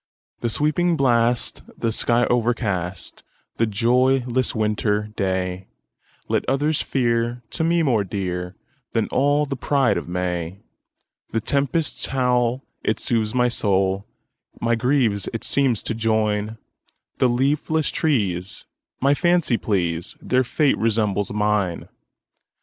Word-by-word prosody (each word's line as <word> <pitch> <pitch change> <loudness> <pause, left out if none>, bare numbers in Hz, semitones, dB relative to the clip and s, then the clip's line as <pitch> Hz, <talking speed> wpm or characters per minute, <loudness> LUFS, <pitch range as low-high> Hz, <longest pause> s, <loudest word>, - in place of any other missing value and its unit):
"The 120 - -1
sweeping 155 +7 +1
blast, 120 -3 +2 0.2
the 115 - -1
sky 120 +2 +2
o'ercast,"The 110 -2 -2
joyless 125 +4 +1
winter 105 -1 0
dayLet 95 -1 -4
others 145 +3 +1
fear, 120 -1 0
to - - -1
me 170 +1 +2
more 120 -8 +2
dearThan 95 +6 -4
all 145 +2 +2
the 140 -1 -4
pride 135 -2 +1
of 85 - -10
May:The 90 +5 -6
tempest's 140 +6 0
howl, 125 -1 +1 0.2
it 110 - 0
soothes 110 -1 0
my 125 -1 +3
soul, 95 -4 +1 0.5
My 115 0 +1
griefs 120 -4 +1
it 115 - -4
seems 130 -6 +1
to - - -2
join; 110 -1 0 0.6
The 130 - +4
leafless 145 +5 +1
trees 100 - -1 0.4
my 140 +2 +4
fancy 175 -4 +2
please, 90 -4 -1
Their 130 0 +1
fate 140 +3 +1
resembles 105 -3 0
mine! 105 -4 0
115 Hz, 110 wpm, -22 LUFS, 105-130 Hz, 0.6 s, The